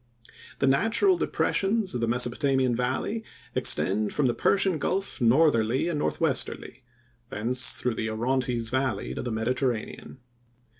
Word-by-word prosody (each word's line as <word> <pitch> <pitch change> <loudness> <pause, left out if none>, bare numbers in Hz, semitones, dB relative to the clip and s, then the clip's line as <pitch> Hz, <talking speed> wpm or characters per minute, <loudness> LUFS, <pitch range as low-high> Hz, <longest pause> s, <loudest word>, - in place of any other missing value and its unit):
The 135 - +1
natural 225 - +3
depressions 210 - 0
of 120 - -3
the 115 - 0
Mesopotamian 125 +1 +1
valley 130 - -2 0.3
extend 105 +3 +1
from 145 - +1
the 120 - +2
Persian 190 0 +1
Gulf 195 -1 -2
northerly 125 0 +3
and 155 -4 -2
northwesterly, 140 -4 -2 0.5
thence 125 +4 +1
through 130 -2 -1
the 110 0 -3
Orontes 120 0 -1
valley 130 -6 -1
to - - -4
the 120 - -4
Mediterranean. 120 +2 -3
130 Hz, 130 wpm, -26 LUFS, 115-150 Hz, 0.5 s, natural